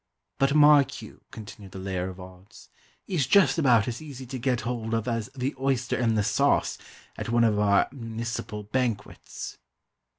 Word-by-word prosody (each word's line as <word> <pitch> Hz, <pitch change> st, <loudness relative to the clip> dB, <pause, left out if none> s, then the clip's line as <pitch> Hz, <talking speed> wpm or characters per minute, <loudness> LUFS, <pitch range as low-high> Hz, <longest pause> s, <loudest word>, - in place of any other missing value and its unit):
"But 135 Hz, +1 st, +2 dB
mark 150 Hz, -2 st, +5 dB
you," -, -, -13 dB
continued 105 Hz, -2 st, -11 dB
the -, -, -7 dB
layer 95 Hz, -1 st, -3 dB
of 95 Hz, 0 st, -10 dB
odds, 95 Hz, +3 st, -14 dB, 0.4 s
"he's 160 Hz, -9 st, -1 dB
just 165 Hz, -4 st, +4 dB
about 125 Hz, -6 st, +4 dB
as 120 Hz, +2 st, -4 dB
easy 135 Hz, -4 st, -9 dB
to 130 Hz, +1 st, -6 dB
get 125 Hz, 0 st, 0 dB
hold 115 Hz, -2 st, -3 dB
of 115 Hz, 0 st, -2 dB
as 115 Hz, -1 st, -2 dB
the 135 Hz, +2 st, -2 dB
oyster 130 Hz, -2 st, 0 dB
in 115 Hz, -3 st, +1 dB
the 105 Hz, -, +2 dB
sauce, -, -, +1 dB, 0.4 s
at -, -, -5 dB
one 120 Hz, 0 st, +3 dB
of 105 Hz, -3 st, +2 dB
our 100 Hz, -1 st, +3 dB
moonicipal 115 Hz, -4 st, -6 dB
banquets!" 120 Hz, -5 st, -3 dB
115 Hz, 170 wpm, -26 LUFS, 105-130 Hz, 0.4 s, mark